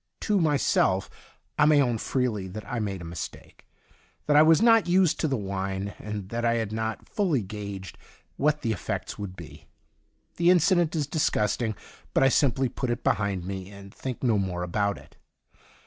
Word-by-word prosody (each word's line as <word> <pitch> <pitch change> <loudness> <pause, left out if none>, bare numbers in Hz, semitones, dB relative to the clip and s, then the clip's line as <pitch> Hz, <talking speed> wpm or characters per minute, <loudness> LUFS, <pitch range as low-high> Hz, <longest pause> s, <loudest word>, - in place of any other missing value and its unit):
To 205 -3 +1
myself 140 - +2 0.5
I 145 - +6
may 150 -1 +5
own 120 -5 +1
freely 115 -8 -1
that 105 +3 -8
I 125 - -3
made 100 -4 -3
a - - -8
mistake, 85 -1 -8 0.6
that 145 - +2
I 150 - +8
was 160 +1 +6
not 225 -2 +5
used 180 -2 +3
to 160 - +1
the 135 -3 0
wine, 95 0 -3
and 105 -3 -6
that 115 +1 -3
I 115 0 +2
had 110 -3 -2
not 110 0 -3
fully 170 - 0
gauged 100 -1 -7 0.4
what 150 +1 +1
the 115 - 0
effects 100 - -4
would 100 -3 -6
be. - - -12 0.7
The 170 +1 +4
incident 175 -2 +3
is 150 -2 0
disgusting, 115 -6 0 0.4
but - - +4
I 135 - +6
simply 135 -1 +2
put 125 +1 -4
it 120 - -2
behind 100 -4 0
me, 95 0 -5
and 100 -1 -12
think 130 -1 -6
no 115 -5 +3
more 90 -2 -2
about 100 +3 -1
it. - - -17
115 Hz, 180 wpm, -26 LUFS, 100-150 Hz, 0.7 s, I